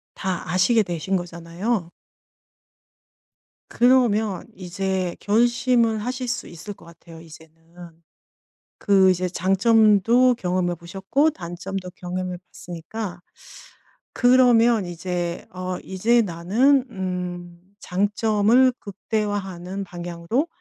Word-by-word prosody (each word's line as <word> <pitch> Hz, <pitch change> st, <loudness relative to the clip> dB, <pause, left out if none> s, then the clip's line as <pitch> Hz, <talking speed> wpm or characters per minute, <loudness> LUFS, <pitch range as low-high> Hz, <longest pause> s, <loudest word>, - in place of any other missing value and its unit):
다 185 Hz, -4 st, -4 dB
아시게 210 Hz, +5 st, +3 dB
되신 175 Hz, 0 st, -3 dB
거잖아요. 175 Hz, +3 st, -4 dB, 1.8 s
그러면 225 Hz, -6 st, +2 dB
이제 185 Hz, 0 st, -3 dB
결심을 235 Hz, +1 st, +2 dB
하실 250 Hz, +3 st, -4 dB
수 250 Hz, +3 st, -3 dB
있을 170 Hz, +5 st, -9 dB
것 180 Hz, -, -19 dB
같아요 170 Hz, 0 st, -14 dB
이제는. 160 Hz, 0 st, -16 dB, 1.1 s
그 195 Hz, -2 st, +4 dB
이제 185 Hz, 0 st, +1 dB
장점도 215 Hz, +6 st, +3 dB
경험해 180 Hz, -3 st, -1 dB
보셨고 195 Hz, -, 0 dB
단점도 185 Hz, -, -6 dB
경험해 180 Hz, 0 st, -4 dB
봤으니까 180 Hz, +2 st, -7 dB, 0.9 s
그러면 240 Hz, -4 st, +4 dB
이제 175 Hz, 0 st, -4 dB
어 185 Hz, 0 st, -4 dB
'이제 225 Hz, +6 st, +2 dB
나는 220 Hz, +10 st, +2 dB
음 180 Hz, -2 st, -5 dB, 0.2 s
장점을 210 Hz, +6 st, +2 dB
극대화하는 200 Hz, -2 st, -4 dB
방향으로 175 Hz, -, -3 dB
190 Hz, 220 characters per minute, -23 LUFS, 175-225 Hz, 1.8 s, 그